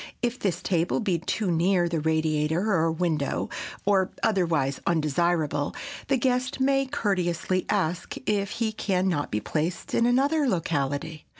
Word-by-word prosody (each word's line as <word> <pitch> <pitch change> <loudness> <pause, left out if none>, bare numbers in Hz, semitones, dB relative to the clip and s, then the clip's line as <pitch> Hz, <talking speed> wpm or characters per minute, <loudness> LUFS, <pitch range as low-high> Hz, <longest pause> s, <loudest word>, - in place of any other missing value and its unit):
If 240 +1 0
this 180 -4 -1
table 175 -2 +1
be 190 -7 0
too 185 +3 -1
near 175 +1 +2
the 170 -1 -1
radiator 160 +4 +1
or 165 -2 +2
window, 160 -4 -1 0.3
or 195 -2 +3
otherwise 165 -10 +1
undesirable, 155 -2 +1 0.3
the 270 - +2
guest 255 +1 0
may 270 0 +2
courteously 185 - -1
ask 180 -4 -1
if 200 -2 0
he 230 -2 0
can 190 -3 0
not 145 -6 0
be 105 - -1
placed 155 - -3
in 235 - +3
another 280 +4 +2
locality. 155 - -2
175 Hz, 140 wpm, -26 LUFS, 160-210 Hz, 0.3 s, or